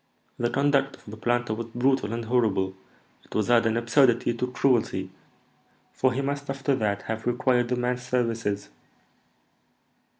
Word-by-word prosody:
"The 120 - +1
conduct 140 +1 +1
of - - -23
the 110 - -8
planter 120 0 0
was 115 +1 -5
brutal 130 -3 +1
and 115 0 -3
horrible; 105 -6 +1 0.5
it - - -13
was 110 +2 +1
adding 115 -1 +4
absurdity 120 0 +3
to 125 +2 -2
cruelty, 115 -8 +1 0.8
for 130 - +2
he 130 +3 -1
must 140 +1 -3
after 135 0 0
that 100 -2 -1
have 110 +1 -4
required 120 0 +2
the 125 - 0
man's 125 0 -1
services." 115 -5 -1
120 Hz, 145 wpm, -26 LUFS, 110-130 Hz, 0.8 s, adding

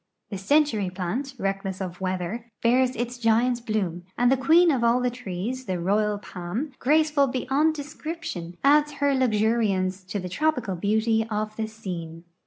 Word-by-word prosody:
The 200 - -3
century 225 -4 +2
plant, 200 +10 -4
reckless 195 -2 -3
of 185 -1 -6
weather, 190 +6 -3
bears 250 +2 +3
its 240 +1 -4
giant 235 +1 +2
bloom, 180 -5 -2
and 245 +1 +4
the - - +5
queen 325 +6 +5
of 255 -5 0
all 235 +1 +4
the 250 0 0
trees, 245 +2 -5
the 185 -4 -2
royal 205 +4 +1
palm, 200 - -5
graceful 300 0 +3
beyond 270 +5 +1
description, 295 - -6
adds 295 +1 +4
her 285 -1 +1
luxuriance 215 -6 +1
to 195 - -4
the 185 - -5
tropical 250 - 0
beauty 220 +4 +1
of 215 0 -2
the 220 0 -2
scene. 175 -7 -7
225 Hz, 160 wpm, -25 LUFS, 190-260 Hz, -, the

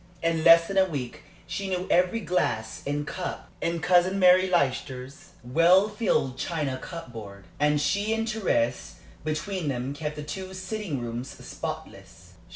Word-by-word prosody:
In 165 -1 +1
less 165 0 +8
than 195 0 +1
a 190 - +5
week 145 -4 -5 0.2
she 190 +2 -4
knew 185 -1 -1
every 180 +6 +3
glass 110 - -1
and 145 +1 -1
cup 180 +4 -5
in 170 0 -1
Cousin 180 +2 +3
Mary 185 0 +6
Leicester's 135 -5 -2
well 170 - +5
filled 195 - 0
china 145 -6 -2
cupboard, 115 - -9
and 150 0 +3
she 200 +9 +1
and 225 0 0
Thérèse 130 - 0 0.3
between 155 +3 -2
them 130 0 -2
kept 150 +1 -4
the 150 - -6
two 190 +5 -6
sitting 185 - -4
rooms 120 +1 -5 0.2
spotless. - - -8
165 Hz, 150 wpm, -27 LUFS, 135-185 Hz, 0.3 s, less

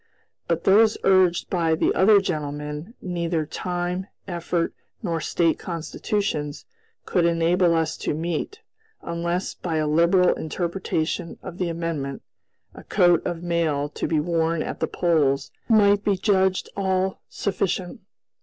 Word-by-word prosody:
But 170 -1 0
those 215 +3 +5
urged 185 -2 +4
by 165 -3 +2
the - - +1
other 200 +2 +6
gentlemen, 150 - -4
neither 170 -3 -1
time, 180 +3 -3 0.2
effort, 170 -1 -1 0.3
nor 165 -4 -1
State 165 0 +1
Constitutions 165 -3 -3 0.4
could 180 - +1
enable 170 +1 +3
us 160 -1 0
to - - -2
meet, 170 - -3 0.4
unless, 170 +2 -2
by 170 -3 -4
a 155 - +1
liberal 170 +4 +4
interpretation 165 0 -3
of 185 -2 -8
the 180 -2 0
amendment, 165 -5 -3 0.5
a - - -12
coat 175 -4 +3
of 175 -1 -4
mail 160 -4 0
to - - -3
be 160 - +1
worn 165 0 0
at - - -5
the - - 0
polls 150 -6 +1 0.2
might 205 -2 +5
be 200 -2 +2
judged 190 -1 +2
all 190 -1 0
sufficient. 190 -2 -2
170 Hz, 135 wpm, -24 LUFS, 160-185 Hz, 0.5 s, other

